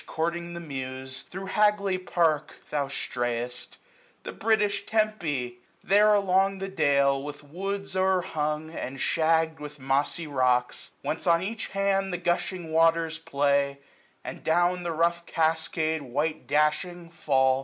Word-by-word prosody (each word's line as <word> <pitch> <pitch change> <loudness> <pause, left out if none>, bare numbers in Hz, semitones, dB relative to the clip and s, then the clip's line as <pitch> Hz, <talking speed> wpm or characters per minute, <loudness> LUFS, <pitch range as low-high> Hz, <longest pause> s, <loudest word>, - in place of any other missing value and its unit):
Courting 170 +1 -2
the - - -5
Muse, 130 -3 -6
thro' 190 +1 -6
Hagley 200 -1 +2
Park 165 -5 +1 0.2
thou 145 -2 0
strayest; 120 -2 -4 0.5
The - - -5
British 210 -2 +1
Tempe! 160 - -1 0.2
There 210 +2 +5
along 195 0 +2
the 195 0 -4
dale, 140 -6 +3
906 145 +1 -7
With 145 - -20
woods 195 +2 -4
o'er 190 0 +3
hung, 155 -2 -2
and 135 -4 -6
shagg'd 160 +1 +2
with 150 0 -9
mossy 135 +5 0
rocks. 125 -4 0
Whence 160 +4 -3
on 170 +1 +4
each 220 +3 -4
hand 195 0 0
the 180 - -1
gushing 175 -1 -2
waters 165 0 +3
play; 140 -2 +1 0.5
And - - -7
down 175 +2 +2
the 175 -1 -3
rough 170 +1 0
cascade 160 0 0
white 145 +4 -2
dashing 155 +4 0
fall. 130 -5 +2
160 Hz, 140 wpm, -27 LUFS, 140-185 Hz, 0.5 s, There